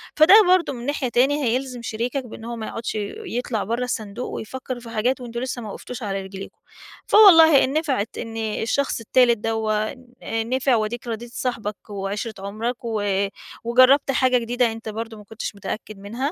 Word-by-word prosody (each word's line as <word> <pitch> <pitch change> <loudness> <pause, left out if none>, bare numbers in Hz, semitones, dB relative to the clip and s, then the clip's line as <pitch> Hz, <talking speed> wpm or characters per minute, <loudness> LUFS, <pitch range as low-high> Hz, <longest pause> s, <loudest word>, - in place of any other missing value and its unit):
فَده 315 +5 +7
برضه 360 -5 +3
من 240 0 -7
ناحية 280 -3 -1
تاني، 275 +5 +2
هيلزم 250 +1 -1
شريكَك 240 +4 -3
بأن 225 -1 -10
هو 235 - -4
ما 220 -2 -5
يقعدّش 230 -1 -4 0.3
يطلع 240 - -2
برّه 235 +4 -2
الصندوق 225 -1 -4
ويفَكّر 255 +2 -6
في 235 -1 -11
حاجات، 245 +4 0
وأنتم 235 -1 -5
لسه 255 -1 -4
ما 215 - -7
وقفتوش 245 +4 -8
على 195 -1 -2
رجلِيكم، 195 0 -9 0.5
فوالله 325 -9 +8
إن 265 - -1
نفعِت 275 -9 -1
إن 225 -1 -6
الشخص 225 +5 -1
التالت 235 +1 +3
دوّة 215 -1 -1
ن 240 -3 -6
نفع، 260 0 +2
وأدِيِك 230 +2 -2
راضيت 235 +1 -5
صاحِبك 220 -6 -4
وعِشرة 205 +2 -4
عُمرَك 225 +5 -4
و 220 -2 -1 0.6
وجرّبت 255 +4 +5
حاجة 255 -1 +3
جديدة، 240 0 +1
أنت 225 0 -7
برضه 225 +1 -6
ما 210 - -12
كنتش 215 0 -6
متأكد 200 +1 -6
منها، 205 +4 -9
235 Hz, 175 wpm, -23 LUFS, 220-255 Hz, 0.6 s, فوالله